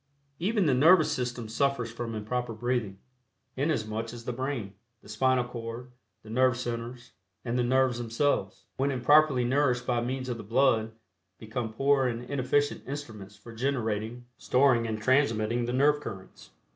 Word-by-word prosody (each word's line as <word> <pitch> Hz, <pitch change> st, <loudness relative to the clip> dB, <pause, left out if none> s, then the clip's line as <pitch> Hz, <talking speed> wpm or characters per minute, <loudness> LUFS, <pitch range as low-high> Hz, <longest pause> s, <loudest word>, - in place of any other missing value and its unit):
Even 205 Hz, +2 st, +1 dB
the 145 Hz, -, +3 dB
nervous 160 Hz, +5 st, +5 dB
system 120 Hz, -2 st, -3 dB
suffers 120 Hz, 0 st, 0 dB
from 115 Hz, -1 st, -5 dB
improper 120 Hz, +3 st, -3 dB
breathing, 120 Hz, -4 st, -2 dB, 0.6 s
inasmuch 115 Hz, -6 st, -2 dB
as 115 Hz, -1 st, -10 dB
the 125 Hz, -, -3 dB
brain, 125 Hz, -6 st, -4 dB, 0.3 s
the -, -, -16 dB
spinal 130 Hz, +4 st, +2 dB
cord, 120 Hz, +1 st, -7 dB, 0.3 s
the 110 Hz, -, -13 dB
nerve 130 Hz, 0 st, +3 dB
centers, 120 Hz, 0 st, -5 dB, 0.3 s
and 120 Hz, 0 st, -2 dB
the 125 Hz, -, +2 dB
nerves 130 Hz, 0 st, +2 dB
themselves, 115 Hz, -4 st, -1 dB
when 135 Hz, +2 st, +1 dB
improperly 140 Hz, 0 st, +4 dB
nourished 125 Hz, -1 st, +1 dB
by 120 Hz, -2 st, 0 dB
means 130 Hz, +2 st, -3 dB
of 120 Hz, -2 st, -3 dB
the -, -, -8 dB
blood, 115 Hz, -1 st, +2 dB, 0.4 s
become 110 Hz, +1 st, -4 dB
poor 135 Hz, +3 st, +2 dB
and 120 Hz, 0 st, -3 dB
inefficient 140 Hz, +2 st, 0 dB
instruments 110 Hz, -8 st, -7 dB
for 115 Hz, -, -13 dB
generating, 115 Hz, -2 st, -2 dB
storing 125 Hz, -3 st, +3 dB
and 110 Hz, -1 st, -4 dB
transmitting 120 Hz, -3 st, +2 dB
the 120 Hz, -, -2 dB
nerve 145 Hz, +3 st, +3 dB
currents. 95 Hz, -8 st, -9 dB
125 Hz, 155 wpm, -28 LUFS, 115-135 Hz, 0.6 s, nervous